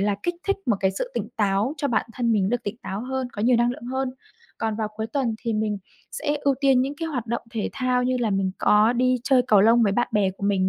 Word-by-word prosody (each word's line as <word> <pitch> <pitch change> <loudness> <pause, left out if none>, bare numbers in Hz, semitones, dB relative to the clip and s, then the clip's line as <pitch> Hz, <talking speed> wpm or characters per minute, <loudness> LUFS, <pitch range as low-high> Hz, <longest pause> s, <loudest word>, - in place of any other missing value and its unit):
là 200 0 +1
kích 350 - -1
thích 395 - +2
một 215 - +2
cái 190 -1 +2
sự 190 - -4
tỉnh 220 -2 -3
táo 205 +6 +1
cho 285 - -1
bản 235 - 0
thân 235 -1 0
mình 195 -3 +2
được 245 +1 -1
tỉnh 210 +1 -4
táo 195 +2 -4
hơn, 260 -1 -3
có 205 - -4
nhiều 245 +1 +4
năng 240 +1 +3
lượng 240 - -7
hơn. 260 0 -2 0.5
Còn 220 -1 -1
vào 215 -2 -2
cuối 220 0 -2
tuần 235 -2 -1
thì 230 -1 -2
mình 215 -1 -1 0.3
sẽ 295 -1 -2
ưu 280 -1 +2
tiên 270 -2 +4
những 275 +2 -3
cái 330 - -3
hoạt 250 -6 -3
động 235 +1 -2
thể 225 -3 -2
thao 255 -1 0
như 255 0 +1
là 225 -3 +1
mình 195 -1 0
có 215 +3 +4
đi 255 +1 +2
chơi 260 -3 +4
cầu 205 -2 +6
lông 230 +3 +5
với 200 -2 +3
bạn 240 +3 +1
bè 200 -3 +2
của 195 - -15
mình 190 -2 +2
230 Hz, 275 wpm, -24 LUFS, 210-255 Hz, 0.5 s, cầu